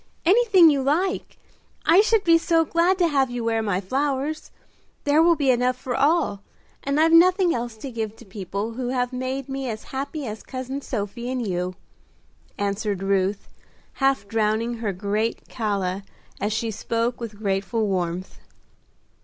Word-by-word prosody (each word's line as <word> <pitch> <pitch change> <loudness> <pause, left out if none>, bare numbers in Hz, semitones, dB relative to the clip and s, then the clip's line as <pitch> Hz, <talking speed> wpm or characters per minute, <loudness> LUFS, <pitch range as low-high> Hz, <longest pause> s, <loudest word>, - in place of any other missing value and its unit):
"Anything 380 -4 +6
you 280 -2 +1
like! 340 +8 -1 0.5
I 360 +4 +7
should 440 -1 +2
be 330 -1 +5
so 330 -1 +2
glad 340 +4 +2
to 350 -2 +3
have 275 -4 +2
you 245 -1 -4
wear 225 -1 +1
my 200 -4 0
flowers. 275 +8 -2 0.5
There 295 +2 +4
will 340 0 +5
be 280 -4 +2
enough 250 +1 +1
for 250 -1 -4
all, 290 -9 +2 0.4
and 280 +2 0
I've 325 +1 +4
nothing 360 +1 +5
else 235 -2 -4
to 260 +4 -7
give 220 -2 -4
to 235 - -15
people 200 +2 -4
who 245 +2 -4
have 250 0 -1
made 260 +1 -3
me 270 -1 -4
as 215 -1 -5
happy 280 +2 -4
as 215 -1 -6
cousin 260 +1 -5
Sophie 235 0 -4
and 255 -2 -2
you," 180 0 -2 0.8
answered 200 -1 -2
Ruth, 195 +1 0 0.5
half 270 -6 +2
drowning 225 +2 0
her 220 -3 -2
great 205 +4 -2
calla 200 -4 -2 0.4
as 205 +2 -1
she 225 +1 -1
spoke 230 +3 -2
with 220 -3 -6
grateful 200 +2 -1
warmth. 180 -2 -3
245 Hz, 160 wpm, -24 LUFS, 210-285 Hz, 0.8 s, I